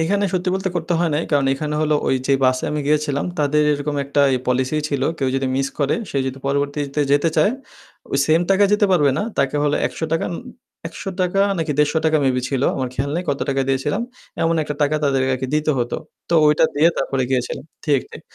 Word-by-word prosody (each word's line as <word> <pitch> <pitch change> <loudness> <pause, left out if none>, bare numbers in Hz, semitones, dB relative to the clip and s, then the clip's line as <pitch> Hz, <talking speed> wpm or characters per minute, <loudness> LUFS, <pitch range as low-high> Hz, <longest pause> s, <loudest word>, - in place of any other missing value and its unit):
এখানে 200 +5 +1
সত্যি 180 0 -1
বলতে 190 -1 -2
করতে 170 +1 -2
হয় 170 -2 +1
নাই। 155 - 0
কারণ 140 -2 +2
এখানে 150 +2 -3
হলো 155 0 +2
ওই - - +3
যে 140 - +2
বাসে 130 0 +2
আমি 150 0 -2
গিয়েছিলাম 150 -1 +1
তাদের 150 +1 +2
এরকম 145 0 -2
একটা 140 +1 0 0.3
পলিসি 130 +4 0
ছিল। 140 -2 -2 0.2
কেউ 135 -2 0
যদি 135 0 -1
মিস 135 0 0
করে 140 0 +1 0.2
সে - - -4
যদি 130 +1 -4
পরবর্তীতে 140 +1 -1
যেতে 145 +3 +3
চায়? 205 - +4 0.6
ওই 140 - +1
সেম 160 +2 +4
টাকা 195 +1 +5
যেতে 210 0 +4
পারবে 145 -6 +4
না। - - 0 0.2
তাকে 140 +1 +1
হল 145 - +1
৳১০০ 165 0 -2 0.6
৳১০০ 180 +3 -2 0.2
নাকি 160 -2 -1
৳১৫০ 150 0 +3 0.3
মেবি 125 -1 +1
ছিল। 135 -1 -1
আমার 130 -2 -2
খেয়াল 140 +3 -2
নেই 175 - -1
কত 140 -1 -1
টাকা 135 0 +1
দিয়েছিলাম। 145 - 0 0.4
এমন 165 0 +2
একটা 150 0 -4
টাকা 150 +1 +2
তাদেরকে 130 -1 +1
দিতে 155 0 +1
হতো। 120 0 -1 0.3
তো 170 - +1
ওইটা 150 +1 +4
দিয়ে 155 +3 +5
তারপরে 135 -1 -1
গিয়েছিলাম। 125 -2 -2 0.2
ঠিক, 145 -4 +2
ঠিক। - - -10
145 Hz, 200 wpm, -20 LUFS, 135-160 Hz, 0.6 s, টাকা